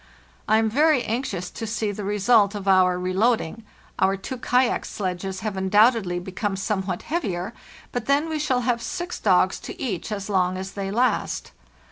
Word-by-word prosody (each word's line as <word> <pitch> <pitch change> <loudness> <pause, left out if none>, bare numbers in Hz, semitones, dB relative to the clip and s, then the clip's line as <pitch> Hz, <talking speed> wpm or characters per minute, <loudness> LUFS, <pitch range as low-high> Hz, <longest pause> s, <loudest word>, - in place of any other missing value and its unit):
I 215 - +4
am 225 0 +2
very 290 +3 +3
anxious 210 -7 -3
to 225 - -6
see 215 -1 -1
the 205 +1 -6
result 205 +1 +3
of 200 -1 -6
our 185 -1 +4
reloading. 195 +3 0 0.4
Our 195 +1 +3
two 255 +7 -6
kayak 250 0 +2
sledges 190 -1 -4
have 210 -1 -3
undoubtedly 195 0 +3
become 190 +3 -3
somewhat 190 -2 -2
heavier, 210 - -2 0.4
but 245 -3 -4
then 285 +3 +3
we 315 -1 -2
shall 265 -4 +1
have 240 -1 0
six 350 +9 -4
dogs 185 -2 +3
to - - -9
each 210 -4 -3
as 200 -2 -3
long 185 -2 +1
as 190 0 -5
they 195 -1 -4
last. 240 +5 0
205 Hz, 170 wpm, -24 LUFS, 190-240 Hz, 0.4 s, I